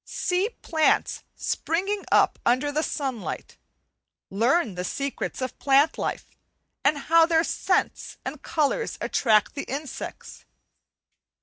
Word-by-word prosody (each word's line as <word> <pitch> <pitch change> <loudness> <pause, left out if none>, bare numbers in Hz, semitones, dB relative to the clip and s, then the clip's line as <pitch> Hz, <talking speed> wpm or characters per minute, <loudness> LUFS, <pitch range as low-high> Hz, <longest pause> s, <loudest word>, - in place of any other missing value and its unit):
See 370 +4 -1
plants 315 -2 +1
springing 390 +5 -1
up - - +4
under 255 +5 +2
the 300 +2 0
sunlight, 270 -7 -4 0.7
learn 230 - +2
the 180 0 -4
secrets 275 +6 -3
of 255 - -5
plant 280 +3 +3
life, - - -3 0.5
and 290 +1 +3
how 325 +3 +4
their 325 -1 +3
scents - - -1
and - - -5
colours 315 - 0
attract 215 -4 +2
the 280 - -4
insects. 285 +2 -7
290 Hz, 115 wpm, -25 LUFS, 260-330 Hz, 0.7 s, up